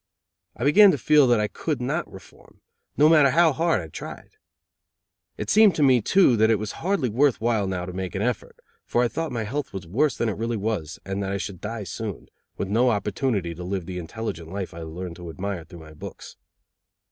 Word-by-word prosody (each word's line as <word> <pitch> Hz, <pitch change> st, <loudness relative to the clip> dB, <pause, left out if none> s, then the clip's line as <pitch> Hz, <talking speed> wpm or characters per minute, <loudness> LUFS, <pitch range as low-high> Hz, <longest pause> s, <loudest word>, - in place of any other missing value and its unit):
I -, -, -4 dB
began 195 Hz, +9 st, +7 dB
to 155 Hz, -, +2 dB
feel 150 Hz, +1 st, +4 dB
that 120 Hz, -2 st, +4 dB
I 105 Hz, -, +1 dB
could 150 Hz, +5 st, -3 dB
not 145 Hz, +8 st, -2 dB
reform, 95 Hz, -, -16 dB, 0.4 s
no 150 Hz, -, +6 dB
matter 155 Hz, -3 st, +6 dB
how 160 Hz, +2 st, +4 dB
hard 160 Hz, -, +1 dB
I 80 Hz, -, -8 dB
tried. 80 Hz, -, -9 dB, 1.1 s
It -, -, -3 dB
seemed 210 Hz, -4 st, +6 dB
to 150 Hz, -, +2 dB
me, 130 Hz, -3 st, +5 dB
too, 180 Hz, -, +4 dB
that 110 Hz, +1 st, +4 dB
it 110 Hz, -, +4 dB
was 105 Hz, +1 st, -4 dB
hardly 185 Hz, -6 st, +1 dB
worth 130 Hz, +4 st, +2 dB
while 110 Hz, -3 st, +1 dB
now 90 Hz, -2 st, -3 dB
to 90 Hz, -, -7 dB
make 95 Hz, 0 st, -5 dB
an 95 Hz, -, -1 dB
effort, 125 Hz, -1 st, -2 dB, 0.3 s
for 120 Hz, -, +1 dB
I -, -, +3 dB
thought 160 Hz, +4 st, -4 dB
my 115 Hz, -2 st, -2 dB
health 135 Hz, +5 st, -4 dB
was 95 Hz, -2 st, -6 dB
worse 135 Hz, -, +1 dB
than 115 Hz, -, 0 dB
it 105 Hz, -, -2 dB
really 115 Hz, +1 st, -2 dB
was 100 Hz, -7 st, -3 dB
and 95 Hz, +1 st, -3 dB
that 95 Hz, -1 st, -2 dB
I 100 Hz, -, -1 dB
should 95 Hz, -1 st, -6 dB
die 110 Hz, 0 st, -4 dB
soon, 100 Hz, +2 st, -6 dB, 0.3 s
with -, -, -2 dB
no 115 Hz, +6 st, +3 dB
opportunity 105 Hz, -3 st, -1 dB
to 90 Hz, +2 st, -8 dB
live 95 Hz, -1 st, -3 dB
the 90 Hz, +1 st, -5 dB
intelligent 85 Hz, -2 st, -6 dB
life 95 Hz, 0 st, -5 dB
I 85 Hz, -, -9 dB
had 80 Hz, -, -7 dB
learned 85 Hz, +1 st, -7 dB
to 85 Hz, -2 st, -8 dB
admire 95 Hz, 0 st, -5 dB
through 85 Hz, -3 st, -12 dB
my 80 Hz, -1 st, -13 dB
books. 75 Hz, -, -10 dB
110 Hz, 225 wpm, -24 LUFS, 95-135 Hz, 1.1 s, began